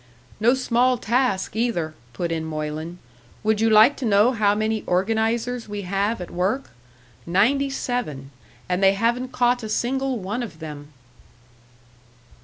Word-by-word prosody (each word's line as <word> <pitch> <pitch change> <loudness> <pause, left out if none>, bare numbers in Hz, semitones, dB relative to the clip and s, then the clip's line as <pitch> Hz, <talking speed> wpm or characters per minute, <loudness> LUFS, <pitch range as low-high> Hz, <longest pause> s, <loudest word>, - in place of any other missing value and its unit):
"No 235 +4 +4
small 255 0 +2
task, 235 -5 0
either," 220 -9 -1 0.2
put 170 +8 -3
in 160 -1 -2
Moylan. 155 +2 -5 0.5
"Would 215 0 +1
you 225 - +4
like 220 +6 +6
to 265 - -4
know 210 +2 +4
how 210 -4 +2
many 215 0 0
organisers 225 +5 0
we 205 -1 -4
have 200 +4 -1
at 180 - -7
work? 195 +10 -1 0.6
Ninety 250 +11 +2
seven. 230 - -3 0.4
And 180 +1 -1
they 195 0 +5
haven't 240 +5 0
caught 245 0 +2
a 220 - -6
single 265 +3 -1
one 210 +4 -3
of 225 -9 -7
them!" 150 -2 -8
215 Hz, 145 wpm, -23 LUFS, 180-245 Hz, 0.6 s, like